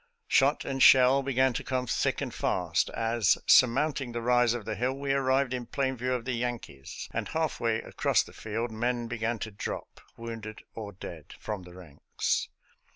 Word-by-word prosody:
" -, -, -52 dB
Shot 140 Hz, +2 st, +3 dB
and 135 Hz, -1 st, -3 dB
shell 130 Hz, +1 st, +7 dB
began 130 Hz, -1 st, +2 dB
to -, -, -3 dB
come 130 Hz, -1 st, -1 dB
thick -, -, 0 dB
and -, -, -4 dB
fast -, -, 0 dB
as, 115 Hz, -3 st, +2 dB
surmounting 130 Hz, 0 st, +4 dB
the 120 Hz, -, -3 dB
rise 120 Hz, -1 st, +3 dB
of 115 Hz, -4 st, -6 dB
the 110 Hz, -, -2 dB
hill, 125 Hz, +5 st, -1 dB
we 140 Hz, 0 st, -1 dB
arrived 135 Hz, -1 st, +1 dB
in 125 Hz, -2 st, -4 dB
plain 130 Hz, +1 st, -1 dB
view 125 Hz, +1 st, -2 dB
of 125 Hz, -2 st, -3 dB
the 130 Hz, -, -1 dB
Yankees, 120 Hz, -, -5 dB
and -, -, -3 dB
half 160 Hz, -2 st, -2 dB
way 115 Hz, -1 st, 0 dB
across -, -, +1 dB
the -, -, -15 dB
field 115 Hz, +2 st, -4 dB
men 120 Hz, +1 st, -1 dB
began 115 Hz, 0 st, -2 dB
to 110 Hz, 0 st, -5 dB
drop, 100 Hz, -, -6 dB, 0.2 s
wounded 115 Hz, -2 st, -7 dB
or 105 Hz, -2 st, -6 dB
dead, 85 Hz, -5 st, -10 dB
from 105 Hz, -3 st, -4 dB
the 90 Hz, 0 st, -13 dB
ranks. 80 Hz, -6 st, -3 dB
120 Hz, 190 wpm, -29 LUFS, 110-130 Hz, 0.2 s, shell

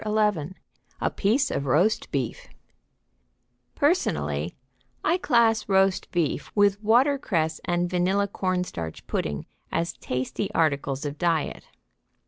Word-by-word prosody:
XI 210 Hz, -6 st, 0 dB, 0.4 s
A -, -, 0 dB
PIECE 240 Hz, +8 st, +1 dB
OF 140 Hz, -, -2 dB
ROAST 175 Hz, -, +2 dB
BEEF 130 Hz, -5 st, -3 dB, 1.3 s
Personally, 75 Hz, +3 st, 0 dB, 0.5 s
I 340 Hz, +4 st, +2 dB
class 235 Hz, -7 st, +3 dB
roast 190 Hz, -1 st, +3 dB
beef 170 Hz, -5 st, -1 dB
with 205 Hz, 0 st, +3 dB
watercress 220 Hz, -, +2 dB
and 175 Hz, 0 st, +1 dB
vanilla 185 Hz, +3 st, +1 dB
cornstarch 180 Hz, -, -3 dB
pudding 75 Hz, -1 st, -2 dB, 0.3 s
as 170 Hz, +1 st, -1 dB
tasty 130 Hz, +10 st, -3 dB
articles 140 Hz, -3 st, +1 dB
of 145 Hz, +1 st, -5 dB
diet. 165 Hz, -4 st, 0 dB
180 Hz, 110 wpm, -26 LUFS, 145-210 Hz, 1.3 s, class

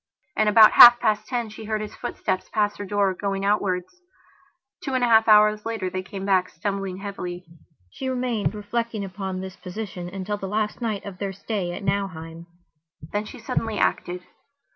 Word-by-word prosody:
And 215 Hz, -1 st, +3 dB
about 215 Hz, 0 st, +8 dB
half 240 Hz, 0 st, +10 dB
past 215 Hz, -2 st, 0 dB
ten 240 Hz, -3 st, -2 dB
she 220 Hz, +1 st, -10 dB
heard 215 Hz, 0 st, -1 dB
his 215 Hz, -1 st, -6 dB
footsteps 185 Hz, -2 st, -3 dB
pass 210 Hz, -1 st, 0 dB
her 205 Hz, -, -5 dB
door, 200 Hz, -1 st, +1 dB
going 195 Hz, +1 st, -3 dB
outwards. 200 Hz, -, -1 dB, 0.8 s
Two 270 Hz, -, -2 dB
and 255 Hz, -, +1 dB
a -, -, +4 dB
half 225 Hz, -1 st, +5 dB
hours 210 Hz, 0 st, +5 dB
later 220 Hz, -5 st, -3 dB
they 185 Hz, -, -3 dB
came 190 Hz, +1 st, -7 dB
back, 185 Hz, -2 st, +2 dB
stumbling 195 Hz, +1 st, -4 dB
heavily. 180 Hz, -3 st, -6 dB, 0.5 s
She 265 Hz, -, -5 dB
remained, 245 Hz, -5 st, -1 dB
reflecting 220 Hz, 0 st, -3 dB
upon 190 Hz, -1 st, -5 dB
this 190 Hz, 0 st, -7 dB
position 180 Hz, -2 st, -7 dB
until 195 Hz, +2 st, -4 dB
the 195 Hz, -, -5 dB
last 210 Hz, +3 st, -2 dB
night 215 Hz, -4 st, -2 dB
of 195 Hz, -3 st, -8 dB
their 200 Hz, -1 st, -2 dB
stay 200 Hz, -2 st, -3 dB
at 200 Hz, -, -7 dB
Nauheim. 170 Hz, -3 st, -3 dB, 0.6 s
Then 205 Hz, +1 st, -2 dB
she -, -, -10 dB
suddenly 225 Hz, -4 st, -3 dB
acted. 180 Hz, +1 st, -1 dB
205 Hz, 180 wpm, -24 LUFS, 185-215 Hz, 0.8 s, half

